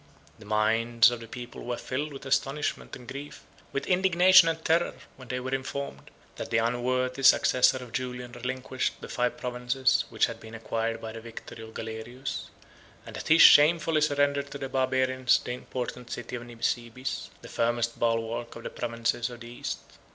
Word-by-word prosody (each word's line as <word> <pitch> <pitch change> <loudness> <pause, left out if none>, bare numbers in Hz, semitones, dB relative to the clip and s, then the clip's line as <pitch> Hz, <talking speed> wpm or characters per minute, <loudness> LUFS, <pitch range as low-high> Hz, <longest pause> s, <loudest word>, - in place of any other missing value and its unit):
The 110 - -13
minds 115 +3 +3
of 120 - -4
the 115 - -10
people 120 +1 -8
were 120 0 -3
filled 145 +4 -3
with 135 -1 -9
astonishment 135 +2 -1
and 125 -2 -13
grief, 140 +2 -8 0.3
with 140 - -2
indignation 185 -1 +6
and 160 0 -4
terror, 165 +2 +2 0.2
when 130 -1 -13
they 125 +1 -2
were 130 +1 -4
informed, 135 +1 -4 0.3
that - - -5
the 115 - +2
unworthy 125 +3 0
successor 130 -1 +5
of 125 -2 -9
Julian 125 -1 -4
relinquished 130 +1 -3
the - - -8
five 125 0 -1
provinces 125 +1 +1
which 110 - +2
had 115 -1 -6
been 110 0 -10
acquired 115 0 -2
by 110 - -6
the 115 0 -8
victory 115 0 -10
of 110 0 -12
Galerius; 115 +4 -5 0.6
and - - -9
that - - -6
he 165 - +6
shamefully 160 0 +7
surrendered 145 -1 +1
to - - -6
the 135 -1 -5
Barbarians 130 -1 +2
the - - -6
important 125 0 -5
city 120 +1 -5
of 120 - -5
Nisibis, 120 +2 -3
the - - -9
firmest 120 0 -1
bulwark 115 0 -1
of 115 - -9
the - - -5
provinces 115 0 -1
of 120 -1 -10
the 120 - -9
East. 120 - -5
125 Hz, 180 wpm, -28 LUFS, 115-135 Hz, 0.6 s, shamefully